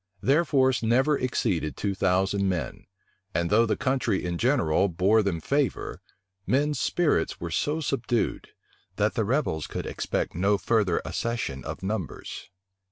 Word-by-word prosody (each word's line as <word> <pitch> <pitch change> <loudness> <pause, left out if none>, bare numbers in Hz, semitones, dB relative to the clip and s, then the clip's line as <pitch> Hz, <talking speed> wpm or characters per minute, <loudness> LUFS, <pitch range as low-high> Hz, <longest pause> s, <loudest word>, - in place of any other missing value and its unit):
Their 145 - +3
force 130 -4 +2
never 130 +6 +3
exceeded 105 - -1
two 100 -1 -1
thousand 95 +1 +1
men; 90 -3 -4 0.5
and 85 +2 0
though 115 +2 +5
the - - 0
country 130 -8 0
in 85 -1 -2
general 100 - +2
bore 95 +6 +3
them 95 -5 -1
favor, 140 - -1 0.5
men's 145 +3 +1
spirits 155 - +1
were 85 -1 -5
so 150 - 0
subdued, 125 -5 -1 0.5
that 105 +1 +1
the 110 - 0
rebels 115 - 0
could - - -5
expect - - -2
no 100 +4 +2
further 105 -5 +1
accession 115 - -3
of - - -6
numbers. 95 -4 -5
110 Hz, 145 wpm, -26 LUFS, 90-130 Hz, 0.5 s, though